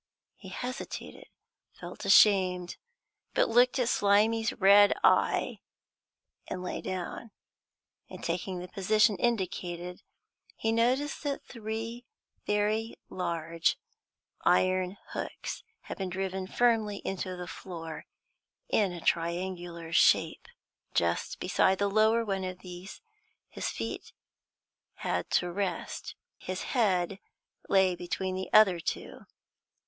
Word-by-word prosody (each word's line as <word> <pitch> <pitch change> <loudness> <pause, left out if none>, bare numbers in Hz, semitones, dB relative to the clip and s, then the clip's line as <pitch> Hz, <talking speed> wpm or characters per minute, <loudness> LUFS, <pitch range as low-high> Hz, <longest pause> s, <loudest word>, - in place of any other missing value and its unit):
He 190 - -12
hesitated, 250 +7 -6 0.5
felt - - -8
ashamed, 185 -4 +5 0.6
but - - +3
looked 245 +3 +4
at 250 -2 +1
Slimy's 220 +1 +3
red 200 0 +6
eye, - - +3 0.9
and 180 - -5
lay 180 - -4
down. 185 +4 -5 0.8
In - - -10
taking 180 +2 -2
the 180 +1 -6
position 210 +3 +3
indicated, 180 -6 -2 0.5
he 225 - -1
noticed 255 +6 +1
that 285 -2 -3
three 230 +1 -6 0.4
very 210 +2 0
large 170 -2 -1 0.7
iron 185 +1 +2
hooks - - -5 0.2
had - - -8
been 190 -1 -2
driven 190 0 -3
firmly 220 -3 +2
into 185 -1 -3
the 180 - -5
floor, 165 -4 -8 0.6
in 200 -4 +2
a 175 - -7
triangular 170 0 -2
shape. - - +3 0.5
Just - - 0
beside 190 0 +2
the 200 - +1
lower 220 +3 +3
one 195 -2 -2
of 185 0 -5
these 180 +1 -9 0.5
his - - -3
feet - - -5 0.8
had - - -2
to 180 0 +1
rest; 195 +1 -4 0.2
his 185 0 -4
head 195 -6 +1 0.5
lay 190 -2 +4
between 185 +2 -3
the 185 0 -4
other 195 -5 +6
two. - - -5
190 Hz, 110 wpm, -29 LUFS, 180-220 Hz, 0.9 s, red